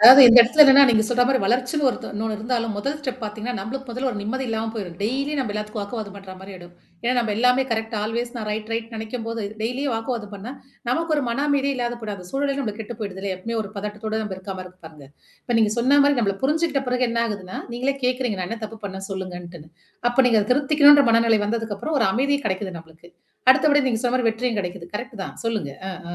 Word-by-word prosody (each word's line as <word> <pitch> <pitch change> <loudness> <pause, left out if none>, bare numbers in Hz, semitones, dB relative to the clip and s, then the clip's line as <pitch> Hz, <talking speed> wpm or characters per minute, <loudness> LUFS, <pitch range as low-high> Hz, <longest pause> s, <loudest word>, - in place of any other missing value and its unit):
அதாவது 255 +5 +11
இந்த 235 - +9
இடத்துல 250 +6 +6
என்னன்னா, 275 -1 +8
நீங்க 220 -2 +4
சொன்ன 245 0 +2
மாரி 265 0 +2
வளர்ச்சுன்னு 250 +7 0
ஒரு - - -5
ஒண் - - -6
இன்னொன்னு 220 +1 -2
இருந்தாலும் 230 0 -2
முதல் 275 +8 -2
ஸ்டெப் 260 -3 -5
பார்த்தீங்கன்னா, 215 +3 -4
நம்மளுக்கு 255 +7 -6
முதல்ல 255 +3 -2
ஒரு 210 - -5
நிம்மதி 260 +6 -3
இல்லாம 225 0 -2
போயிடும். 185 -6 -6
டெய்லி 270 +7 -1
நம்ம 245 -6 -2
எல்லாத்துக்கும் 210 0 -4
வாக்குவாதம் 205 -1 -6
பண்ற 195 -1 -10
மாரி 195 +1 -10
ஆயிடும். 175 -1 -13 0.3
ஏன்னா, 245 - +2
நம்ம 230 -3 0
எல்லாமே 250 +3 +3
கரெக்ட 225 0 -3
ஆல்வேஸ் 235 +3 -3
நான் 215 -2 -4
ரைட் 215 +1 -4
ரைட் 230 0 -3
நெனைக்கும்போது 225 0 -5 0.2
டெய்லியே 250 +6 -2
வாக்குவாதம் 225 -2 -4
பண்ணா, 205 +6 -7 0.4
நமக்கு 320 +5 0
ஒரு 290 - 0
மன 255 +5 -1
அமைதியே 280 0 +1
இல்லாத 240 -1 -2
கூடாது. 210 -2 -5
அந்த 180 - -11
சூழலே 275 0 -1
நம்மக்கு 220 -5 -4
கெட்டு 225 +1 -9
போயிடுதில்லயா. 195 -2 -4
எப்பவுமே 230 +5 -4
ஒரு 200 - -9
பதட்டத்தோட 210 +2 -5
நம்ம 210 -3 -4
இருக்காமாரி 185 -1 -7
இருக்கு 180 -1 -24
பாருங்க. 150 -3 -13 0.4
இப்ப 240 -2 -1
நீங்க 215 -2 +3
சொன்ன 265 +4 +4
மாரி 285 0 +3
நம்மள 200 -4 0
புரிஞ்சுக்கிட்ட 300 -1 +1
பிறகு 250 0 +1
என்ன 230 0 0
ஆகுதுன்னா, 200 -4 -6 0.2
நீங்களே 260 +3 -1
கேட்கறீங்க. 250 -5 0
நான் 180 - -3
என்ன 230 0 -5
தப்பு 220 +1 -8
பண்ணே 190 -1 -7
சொல்லுங்கன்ட்டுன்னு. 175 -4 -7 0.4
அப்ப 245 - -5
நீங்க 225 -3 +4
அத 205 - -6
திருத்திக்கணுன்ற 290 +1 +6
மனநிலை 230 -1 +4
வந்ததுக்கப்புறம் 225 +6 -2
ஒரு 225 - +4
அமைதியு 280 +3 +1
கெடைக்குது 190 -2 -3
நம்மளுக்கு. 165 +1 -16 0.4
அடுத்தபடி 290 +1 +4
நீங்க 225 -3 -1
சொன்ன 245 0 +1
மாரி 250 -3 +2
வெற்றியும் 225 0 -2
கெடைக்குது. 180 -1 -7
கரெக்ட் 240 -2 -8
தான். - - -9
சொல்லுங்க. 215 -12 -2 0.2
அ - - -5 0.2
ஆ. - - -4
225 Hz, 220 wpm, -23 LUFS, 205-255 Hz, 0.4 s, அதாவது